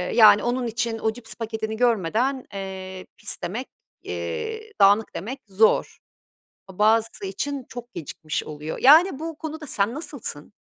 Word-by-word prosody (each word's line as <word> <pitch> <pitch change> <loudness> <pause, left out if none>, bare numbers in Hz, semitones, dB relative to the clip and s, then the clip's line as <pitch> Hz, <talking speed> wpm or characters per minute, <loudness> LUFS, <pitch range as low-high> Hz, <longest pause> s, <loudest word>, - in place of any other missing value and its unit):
yani, 215 -2 +8
onun 245 0 0
için 230 0 -2
o 220 - 0
cips 225 -1 -10
paketini 220 -1 -4
görmeden, 240 +3 +1
eee, 190 -1 -6
pis 205 - -5
demek, 220 +9 -3 0.3
eee, 435 - -5
dağınık 205 +3 +5
demek 250 +9 -5
zor. 205 +3 +3 0.7
A 190 - -13
bazısı 220 0 +3
için 275 +7 -3
çok 245 0 -9
gecikmiş 155 -1 -4
oluyor. 150 +1 -6
Yani, 305 +3 +7
bu 325 -1 -5
konuda 315 0 -6
sen 210 -2 0
nasılsın? 270 - -7
225 Hz, 140 wpm, -24 LUFS, 195-260 Hz, 0.7 s, yani